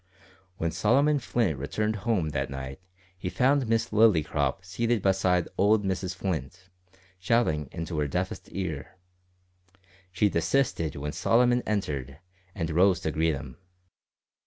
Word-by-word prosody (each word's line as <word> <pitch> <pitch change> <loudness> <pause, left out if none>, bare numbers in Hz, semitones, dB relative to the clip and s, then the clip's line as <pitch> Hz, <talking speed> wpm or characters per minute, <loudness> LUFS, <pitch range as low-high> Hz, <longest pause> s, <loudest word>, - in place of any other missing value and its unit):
When 85 0 -1
Solomon 135 - +3
Flint 110 - 0
returned 105 +10 -1
home 100 -7 0
that 70 -2 -2
night 65 +1 -7 0.3
he 90 0 -4
found 135 +4 +2
Miss 115 0 +1
Lillycrop 90 -7 +2
seated 115 +4 -1
beside 95 -3 +2
old 105 +1 +4
Mrs 95 -1 -2
Flint, 90 0 -4 0.5
shouting 90 - +1
into 85 -2 -4
her 75 - +1
deafest 90 +5 -3
ear. 90 -3 -5 1.1
She 90 +4 +2
desisted 85 - 0
when 75 +1 -4
Solomon 120 +7 +3
entered, 70 -10 -2 0.4
and 85 -5 -2
rose 90 +2 +4
to 80 - -1
greet 80 0 +1
him. 70 -3 -9
90 Hz, 130 wpm, -27 LUFS, 75-110 Hz, 1.1 s, old